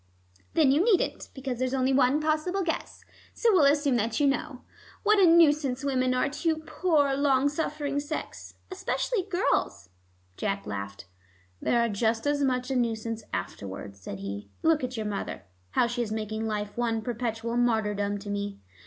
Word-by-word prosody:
"Then 305 -5 +5
you 295 +6 +4
needn't, 420 -4 +1
because 260 -3 -4
there's 255 +1 0
only 260 0 +2
one 265 +2 +4
possible 315 +5 0
guess. 330 -2 -4 0.3
So 460 -2 +3
we'll 330 -7 +5
assume 285 -4 +1
that 225 0 -1
you 290 - +3
know. 275 -1 -1 0.4
What 420 0 +4
a 375 - +7
nuisance 295 -6 +4
women 255 -2 +1
are 255 - +2
to 295 +4 -4
your 320 - +1
poor, 315 -3 +1
long 275 0 +3
suffering 290 -1 -2
sex. 295 +2 -6 0.2
Especially 390 +4 -1
girls." 350 - -1 0.5
Jack 200 -1 -2
laughed. 100 -1 -6 0.6
"They - - +1
are 235 0 +3
just 225 +2 0
as 290 0 +1
much 255 -1 0
a - - 0
nuisance 225 -2 -1
afterwards," 95 +1 -6
said 95 +1 -7
he. 100 +1 -6
"Look 320 -3 +3
at 250 -1 -3
your 220 - -2
mother, 205 -1 -4 0.3
how 105 - +2
she 240 +1 -2
is 225 -3 -3
making 220 0 -3
life 210 -1 -3
one 230 -2 -1
perpetual 230 0 -3
martyrdom 210 -4 +1
to 205 - -7
me." 200 0 -3
255 Hz, 170 wpm, -28 LUFS, 220-295 Hz, 0.6 s, a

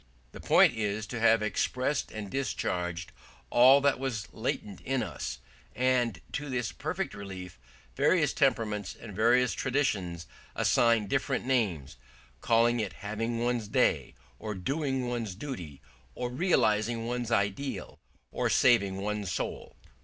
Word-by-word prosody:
The - - -10
point - - +5
is 105 -1 -2
to 120 +3 -5
have 115 -1 +4
expressed 130 +6 -1
and 105 -2 -6
discharged 90 -9 -2 0.4
all 130 +3 +7
that 140 -2 +2
was 125 -6 -3
latent 105 -4 -4
in 135 -1 -1
us; - - -5 0.4
and 125 -6 +1
to 145 +1 -4
this 125 -4 -2
perfect 180 +6 -3
relief 95 -7 -8 0.4
various - - +3
temperaments 105 -4 0
and 105 -4 -9
various 120 +3 +3
traditions 100 - -1 0.3
assign 115 -3 +3
different 135 +4 -1
names, 90 - 0 0.4
calling 115 +1 +3
it 105 -3 -2
having 115 +3 -2
one's 120 -3 0
day, - - +1 0.2
or 105 -1 -4
doing 135 - -1
one's 115 -5 -3
duty, 90 - -7 0.3
or 125 0 -3
realising 115 - +1
one's 120 -1 -2
ideal, 115 +5 -2 0.3
or - - 0
saving 100 -6 +4
one's 105 -1 -3
soul. - - -4
115 Hz, 130 wpm, -29 LUFS, 100-125 Hz, 0.4 s, all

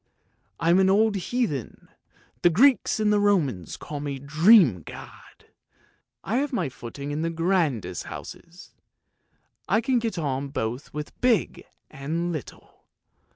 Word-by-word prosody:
I 165 - +2
am 180 - +5
an 190 0 +4
old 215 +2 +3
heathen; 195 - -3 0.5
the 175 - +5
Greeks 250 - +3
and 210 -1 +2
Romans 145 - 0
call 150 -1 -7
me 140 -1 -4
the 135 - -13
Dream 155 - +5
god! - - -13 0.8
I 215 +8 -1
have 285 +1 -1
my 185 - -1
footing 140 +4 -8
in 150 +2 -2
the 165 - -1
grandest 165 - -1
houses; 170 +2 -10 1.0
I 220 - +4
can 245 +2 +1
get 225 -5 -3
on 140 -3 -2
both 125 0 -4
with 150 0 -8
big 245 -4 +1 0.3
and 165 +6 -3
little! 155 -5 -9
165 Hz, 140 wpm, -25 LUFS, 140-205 Hz, 1.0 s, am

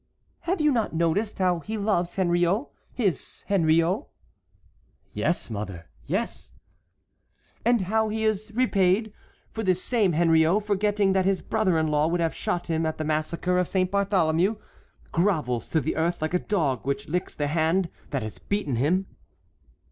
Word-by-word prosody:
"Have 370 0 +1
you 300 -1 +3
not 225 -9 0
noticed 170 +6 0
how 180 -2 +2
he 220 +6 -5
loves 195 -4 0
Henriot, 175 +5 +2 0.3
his 195 - -2
Henriot?" 170 - +2 1.1
"Yes, 170 -8 0
mother, 95 -6 -6 0.2
yes." - - -3 1.1
"And 235 -1 +3
how 220 +4 +1
he 220 +1 -1
is 215 0 -1
repaid, 210 -3 +2 0.4
for 225 - -4
this 185 -4 +1
same 205 -3 +1
Henriot, 165 +4 +3
forgetting 205 -1 +1
that 190 -1 +2
his 195 -1 +1
brother 185 -5 +1
in 160 - +2
law 150 +1 +2
would 175 +1 0
have 165 -1 0
shot 175 - -2
him 165 -1 -1
at 160 -1 -2
the 155 - -2
massacre 155 +4 0
of 180 - +1
Saint 185 -1 0
Bartholomew, 195 -1 +2 0.6
grovels 155 - 0
to 160 - +2
the 155 - -2
earth 170 +2 0
like 155 +2 -2
a 180 - +3
dog 150 - -1
which 140 +1 -2
licks 180 +3 -2
the 145 - -1
hand 165 +4 +1 0.2
that 135 -5 -2
has 110 - -6
beaten 180 - -2
him." 175 +10 +1
180 Hz, 160 wpm, -26 LUFS, 160-205 Hz, 1.1 s, you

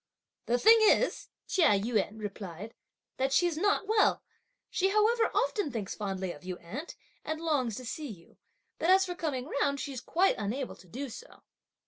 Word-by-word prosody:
"The 240 - +3
thing 450 - +7
is," 435 +3 +3 0.2
Chia 310 - +4
Yün 220 0 -1
replied, 205 -1 -7 0.4
"that 265 +1 0
she's 340 +4 +3
not 405 +4 +1
well: 435 0 +3 0.5
she, 385 +1 +2
however, 440 +3 +3
often 410 -9 0
thinks 215 -4 -4
fondly 190 -3 -3
of 145 - -12
you, 180 -1 -5
aunt, 250 - -8 0.3
and 315 0 -3
longs 285 -9 0
to 255 - -7
see 295 +5 -5
you; 175 -6 -13 0.4
but 335 - +1
as 380 +1 +6
for 360 - -4
coming 290 -7 -3 0.2
round, 280 -1 +1
she's 265 -4 -5
quite 365 +8 +2
unable 240 +6 -3
to 185 - -18
do 260 +10 -5
so." 470 - -12
270 Hz, 170 wpm, -30 LUFS, -, 0.5 s, thing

